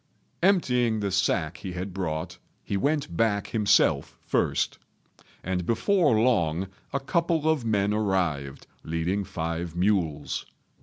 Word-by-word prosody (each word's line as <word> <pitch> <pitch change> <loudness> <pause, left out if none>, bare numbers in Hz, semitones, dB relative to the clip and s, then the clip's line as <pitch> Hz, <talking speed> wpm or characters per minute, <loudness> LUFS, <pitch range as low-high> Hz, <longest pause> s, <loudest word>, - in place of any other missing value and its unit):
Emptying 125 - +3
the 100 -1 -1
sack 90 -3 +1
he 95 - -6
had 90 +1 -5
brought, 80 -4 -3 0.2
he - - -3
went 140 - 0
back 105 0 +1
himself 105 -10 +2
first; - - 0 0.6
and 90 0 -1
before 145 - +2
long 95 -8 +2 0.3
a 140 - 0
couple 165 +2 0
of 155 -6 +1
men 105 -2 +1
arrived 90 -10 -1 0.2
leading 85 +5 -1
five 85 -1 -4
mules. 90 -5 0
100 Hz, 120 wpm, -26 LUFS, 85-120 Hz, 0.6 s, Emptying